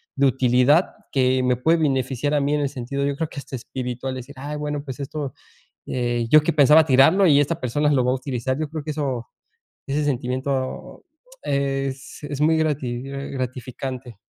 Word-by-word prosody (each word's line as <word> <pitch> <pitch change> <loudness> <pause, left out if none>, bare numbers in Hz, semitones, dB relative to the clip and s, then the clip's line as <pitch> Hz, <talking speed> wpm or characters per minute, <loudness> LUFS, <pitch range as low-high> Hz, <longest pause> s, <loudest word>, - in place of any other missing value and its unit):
de 140 - +3
utilidad 130 +5 +3 0.2
que 130 -1 +2
me 125 0 +2
puede 160 +7 +3
beneficiar 135 -1 0
a - - +3
mí 140 +1 0
en 150 - +1
el 140 - 0
sentido, 135 +2 -4
yo 140 0 -1
creo 160 +2 -2
que - - -7
hasta 135 - -7
espiritual, 125 +1 -5
decir: 130 +2 -8
"Ay, 145 +2 -5
bueno, 150 -1 -3
pues 130 -1 -7
esto, 140 -1 -4 0.5
eh, 120 -2 -1
yo 155 +3 +7
que - - +1
pensaba 150 +1 +6
tirarlo 155 +8 +5
y 145 -3 +6
esta 150 +3 0
persona 145 +3 +1
lo 130 -4 +2
va 125 - +2
a - - +1
utilizar". 130 -1 -3
Yo 155 -2 -2
creo 155 -1 -5
que 155 - -3
eso 135 -6 -3 0.6
ese 145 +2 0
sentimiento 130 0 -3 0.4
es 135 0 -2
es 145 -1 -4
muy 160 +1 +4
grati 140 -6 -1
gratificante. 130 -3 -5
135 Hz, 185 wpm, -23 LUFS, 130-145 Hz, 0.6 s, yo